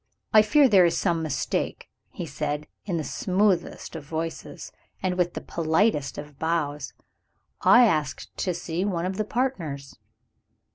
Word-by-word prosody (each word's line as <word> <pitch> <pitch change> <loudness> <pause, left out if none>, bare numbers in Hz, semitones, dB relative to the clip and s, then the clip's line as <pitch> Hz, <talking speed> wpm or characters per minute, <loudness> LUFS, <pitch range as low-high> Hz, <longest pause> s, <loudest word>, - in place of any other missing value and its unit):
"I 215 - +9
fear 280 +6 +5
there 195 -6 +6
is 170 - 0
some 170 -3 +1
mistake," 155 -4 -2 0.2
he - - -6
said, 150 +1 -3 0.2
in 180 -4 -1
the 160 - -2
smoothest 190 - 0
of 160 - -6
voices, 160 +2 -5 0.3
and 185 -1 0
with 175 -1 0
the - - -4
politest 160 -1 0
of 145 -1 -9
bows; 150 -3 -1 0.7
"I 245 0 +7
asked 155 - -1
to 180 -2 -1
see 170 +1 -3
one 180 -4 -1
of 190 +1 -3
the 215 - 0
partners." 170 - -3
170 Hz, 150 wpm, -26 LUFS, 155-200 Hz, 0.7 s, I